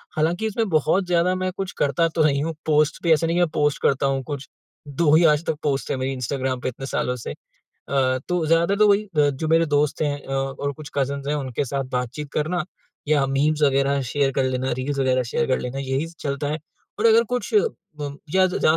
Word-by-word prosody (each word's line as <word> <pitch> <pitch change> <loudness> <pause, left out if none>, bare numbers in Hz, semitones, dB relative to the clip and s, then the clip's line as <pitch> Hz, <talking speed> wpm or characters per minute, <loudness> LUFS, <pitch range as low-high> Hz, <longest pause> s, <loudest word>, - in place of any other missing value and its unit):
हालाँकि, 170 +6 0
इसमें 220 0 -1
बहुत 160 +4 +2
ज़्यादा 175 +1 +2
मैं 185 0 -2
कुछ 195 -1 -3
करता 145 +4 +2
तो 160 - +3
नहीं 140 -1 +2
हूँ। 165 +1 -2
पोस्ट 150 -1 +2
भी 170 - +3
ऐसा 160 +2 +1
नहीं 170 - 0
है - - +3
कि - - +5
मैं - - -7
पोस्ट 145 -1 +1
करता 140 0 +2
हूँ 135 -1 0
कुछ, 140 -3 -5 0.4
2 150 +2 +2
ही 165 - +5
आज 150 +2 +1
तक - - 0
पोस्ट 140 -2 -1
हैं - - -1
मेरी 130 +1 -2
इंस्टाग्राम 130 0 -2
पे - - -1
इतने 135 +2 -8
सालों 125 -1 -1
से। 125 - -6
अ, - - -7 0.9
तो 180 -2 0
ज़्यादातर 165 +4 +3
तो 210 - +6
वही 205 +1 +3
ब 145 -1 +4
जो 160 - -1
मेरे 165 +1 +4
दोस्त 145 -1 +1
हैं 145 -2 0
अ, 135 - -6
और 135 +1 -2
कुछ 145 +1 -10
कज़िन्स 140 0 -1
हैं, 150 - 0
उनके 135 -1 -2
साथ 135 +1 -2
बातचीत 130 +4 -3
करना 165 +3 0 0.4
या 145 -2 +3
मीम्स 145 +3 +1
वगैरह 140 0 +2
शेयर 140 -2 +1
कर 135 - 0
लेना, 130 0 -1
रील्स 140 +2 -2
वगैरह 130 -1 +2
शेयर 155 - 0
कर 130 - +1
लेना, 125 +2 -4
यही 135 +2 -1
चलता 140 0 -2
है। 150 +2 -1 0.4
और 220 - +1
अगर 230 0 +6
कुछ 250 - -3 0.5
मम 145 -1 -5 0.2
या 190 0 +6
ज़ - - -5
ज़्यादा - - +4
145 Hz, 235 wpm, -23 LUFS, 135-165 Hz, 0.9 s, तो